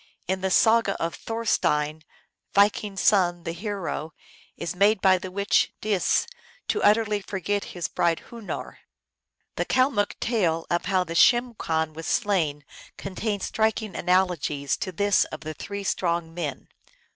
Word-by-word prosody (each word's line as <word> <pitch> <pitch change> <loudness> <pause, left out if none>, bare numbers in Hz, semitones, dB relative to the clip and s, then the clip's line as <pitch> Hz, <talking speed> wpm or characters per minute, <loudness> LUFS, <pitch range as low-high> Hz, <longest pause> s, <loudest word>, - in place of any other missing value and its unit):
In 190 +1 -1
the 190 - 0
saga 220 +1 +3
of 165 0 -2
Thorstein, 160 -10 0 0.5
Viking 205 0 +3
s 195 - -3
son 175 -4 +3
the 165 - -3
hero, 175 -4 -4 0.4
is 170 - -4
made 200 +3 +4
by 190 -1 +4
the 185 - -6
witch 200 +2 +1
Dis 205 -4 +1 0.4
to 425 - +1
utterly 210 -1 +3
forget 200 +1 -2
his 175 -3 -4
bride 170 -1 0
Hunoor. 230 -4 -7 0.8
The - - 0
Kalmuk 255 -6 +1
tale 175 -9 0
of 175 - 0
How 185 -1 +2
the 165 -2 -6
Schimm 240 +7 +4
Khan 160 -6 -1
was 165 +1 -7
Slain 170 -10 0 0.3
contains 200 +1 -3
striking 220 -2 -1
analogies 175 -6 +1
to 185 - -4
this 200 +3 +2
of 155 - -8
the 155 +1 -5
Three 200 +5 -6
Strong 170 -3 -1
Men. 155 -6 -5
190 Hz, 145 wpm, -25 LUFS, 165-210 Hz, 0.8 s, made